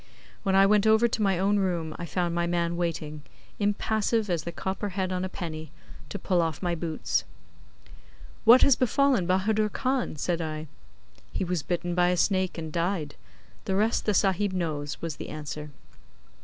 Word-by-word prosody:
When 190 -1 +1
I 195 0 +7
went 210 +1 +4
over 220 +2 +5
to 230 -1 -2
my 195 -3 +2
own 200 +3 +2
room 170 -5 -1
I 170 - -6
found 175 +1 -1
my 170 0 0
man 170 0 0
waiting, 155 -3 -3 0.4
impassive 215 +1 0
as 165 -3 -1
the 170 - -3
copper 190 +3 -3
head 185 -1 -2
on 180 0 -1
a 185 - -2
penny, 160 -4 -6 0.4
to - - -4
pull 180 -2 +1
off 160 -3 -1
my 175 -1 0
boots. 165 -1 -1 1.2
'What 240 +3 +8
has 280 - +6
befallen 255 -5 +2
Bahadur 210 +3 +2
Khan?' 255 -2 -1
said 170 +3 -1
I. 155 -1 -4 0.7
'He - - -2
was 180 -2 -1
bitten 175 +2 -2
by 175 0 +3
a 180 - +1
snake 185 0 +1
and 160 -2 -6
died. 170 -3 -1 0.5
The 190 - 0
rest 215 +4 +1
the 210 - +3
Sahib 195 +1 +2
knows,' 150 -5 -3
was 160 -3 -3
the - - -7
answer. 150 0 -6
180 Hz, 180 wpm, -27 LUFS, 165-205 Hz, 1.2 s, What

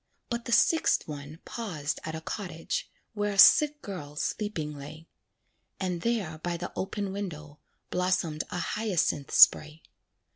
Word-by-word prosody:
But 235 0 -3
the 240 - -5
sixth 320 +7 +3
one 150 +1 -8
paused 160 -11 -4
at 160 0 -5
a 160 - -6
cottage, 165 -2 -4 0.2
Where 205 -1 -1
a - - -6
sick 295 +8 +7
girl 150 -7 -7
sleeping 155 -4 -3
lay; 150 +3 -10 0.7
And 180 -3 -2
there 200 -9 -1
by 170 +1 -3
the 175 - -6
open 195 0 -3
window, 155 -7 -6 0.3
Blossomed 180 -4 0
a - - -4
hyacinth 175 -6 -1
spray. 155 +1 +6
175 Hz, 140 wpm, -28 LUFS, 155-205 Hz, 0.7 s, sick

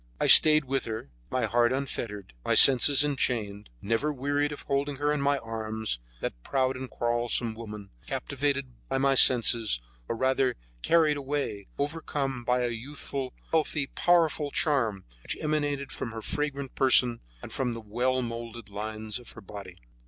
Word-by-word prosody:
I - - +1
stayed 155 -1 +8
with 135 0 -1
her, 110 - -6 0.2
my 130 - 0
heart 120 0 +2
unfettered 120 -7 -4
and - - -32
my - - +1
senses 135 +2 +8
enchained, 115 -8 -2
never 115 +8 0
wearied 145 +1 -1
of 145 - -8
holding 140 0 -1
her 145 +2 0
in 150 - -2
my 140 0 +2
arms, 110 - -4 0.2
that - - -5
proud 130 - 0
and 130 0 -7
quarrelsome 120 -1 -1
woman, 105 -3 -9 0.2
captivated 140 -2 -2 0.2
by 135 - 0
my 135 0 +2
senses, 115 - +5 0.3
or - - -3
rather 130 +1 +1 0.3
carried 160 -3 +3
away, 140 -8 -4
overcome 140 -4 -3
by 125 +1 +1
a 120 - 0
youthful, 130 +2 -6 0.2
healthy, 150 -3 0
powerful 165 -4 +2
charm, 130 - 0 0.2
which - - -5
emanated 145 -2 -2
from 115 - -6
her 110 -1 -7
fragrant 140 -1 -4
person 125 -3 +3 0.2
and - - -9
from 125 -3 -2
the 115 - -6
well 125 +4 -1
molded 115 -2 -7
lines 110 +2 -5
of 120 - -13
her - - -12
body. 95 -2 -10
130 Hz, 160 wpm, -27 LUFS, 115-140 Hz, 0.3 s, stayed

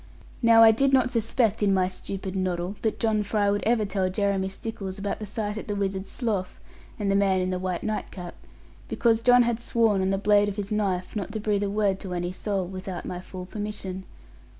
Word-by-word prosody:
Now 230 -1 +7
I 225 - +9
did 270 +5 +2
not 255 -2 +4
suspect 225 -2 +1
in 200 -2 +3
my 185 -1 +2
stupid 190 +1 -6
noddle 185 0 -1
that 220 - -1
John 220 -2 +2
Fry 205 0 +1
would 205 0 0
ever 225 -2 +3
tell 195 -2 0
Jeremy 195 0 0
Stickles 195 -1 -6
about 200 0 -3
the 215 - -6
sight 210 +1 -3
at - - -9
the 205 - -2
Wizard's 195 -1 -2
Slough 210 -7 -2 0.4
and 205 -2 0
the - - +2
man 195 -1 +3
in 185 0 -1
the 185 - -2
white 180 -2 -3
nightcap; 190 -4 -4 0.6
because 230 -1 +2
John 245 +1 +6
had 235 -1 0
sworn 225 -4 +2
on 190 - +1
the 195 - +1
blade 205 +1 +3
of 200 - -5
his 205 0 -5
knife 195 -3 -1
not 205 -1 -3
to 220 - -2
breathe 205 -1 0
a 205 - 0
word 200 -2 +1
to 185 -3 -5
any 175 0 -2
soul, 195 0 -2
without 185 0 -6
my 180 - -4
full 185 0 -8
permission. 195 -2 -5
200 Hz, 220 wpm, -26 LUFS, 190-215 Hz, 0.6 s, I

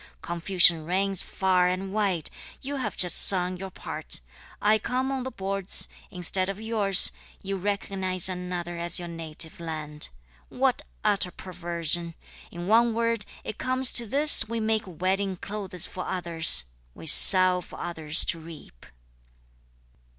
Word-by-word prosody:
Confusion 170 -1 +3
reigns 190 +3 -1
far 185 -1 +1
and 190 +2 -3
wide! 195 -7 -1 0.3
you 280 +1 -6
have 260 - -4
just 180 -2 +5
sung 180 -1 +4
your 190 +1 -7
part, - - -6 0.4
I 215 +1 +3
come 255 +4 -2
on 265 -1 -3
the 260 - -5
boards, 195 -3 0 0.2
Instead 185 +1 +3
of 195 +1 -5
yours, 215 -4 +4 0.3
you 195 0 -3
recognise 190 -2 0
another 180 -2 -4
as 170 0 +1
your 175 - -5
native 165 -1 -5
land; 155 -2 -5 0.4
What - - 0 0.2
utter 195 -2 +1
perversion! 170 -2 -1 0.3
In 175 0 -8
one 225 +3 +3
word, 230 -2 -1 0.2
it 215 - -7
comes 255 0 +1
to 235 -1 +3
this 280 -3 +3
we 230 0 -3
make 220 0 0
wedding 190 +2 -2
clothes 195 -3 -3
for 185 - -7
others! 170 - +1 0.3
(We - - -12
sow 185 +3 +6
for - - -11
others 160 -2 +2
to 165 - 0
reap.) 155 - -13
185 Hz, 145 wpm, -26 LUFS, 170-205 Hz, 0.4 s, sow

